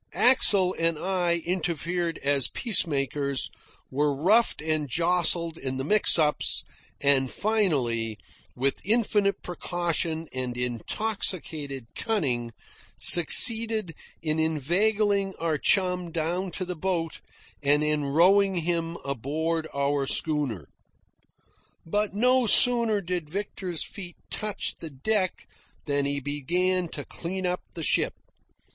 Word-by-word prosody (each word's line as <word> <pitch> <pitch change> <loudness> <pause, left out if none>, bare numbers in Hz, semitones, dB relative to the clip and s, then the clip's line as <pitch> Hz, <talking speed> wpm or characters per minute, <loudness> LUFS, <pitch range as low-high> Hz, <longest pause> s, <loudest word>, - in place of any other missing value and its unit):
Axel 200 -7 +5
and 165 -1 0
I 175 -2 -1
interfered 170 -1 -2
as 140 -1 +2
peacemakers, 140 - 0 0.4
were 145 +1 0
roughed 205 +11 +2
and 155 -2 -2
jostled 170 +1 0
in 130 -1 -4
the 130 - -3
mix 210 +7 +5
ups, 150 -2 +1 0.4
and 140 -2 +2
finally, 130 - -1 0.4
with 135 +2 -1
infinite 205 -2 0
precaution 170 -2 -3
and 125 -1 -4
intoxicated 140 - -1
cunning, 130 - -2 0.5
succeeded 220 +2 +6 0.3
in 155 0 -1
inveigling 195 +6 0
our 160 -3 -2
chum 180 -1 +1
down 170 +4 -2
to 185 - -4
the 180 0 -5
boat 170 -1 -3 0.4
and 145 +1 +2
in 150 -1 -1
rowing 190 +7 +3
him 170 0 -2
aboard 155 +5 -3
our 140 0 -1
schooner. 135 - 0 1.2
But 205 +4 -2
no 250 +2 +3
sooner 230 -2 +4
did 175 -4 -4
Victor's 185 -2 -5
feet 180 -5 -10
touch 210 -1 -3
the 165 - -5
deck 185 +7 -2 0.4
than 145 -1 -1
he 140 0 -2
began 175 +6 -1
to 145 -3 -7
clean 185 +2 -6
up 180 0 -2
the 165 - -5
ship. - - 0
165 Hz, 115 wpm, -25 LUFS, 145-190 Hz, 1.2 s, succeeded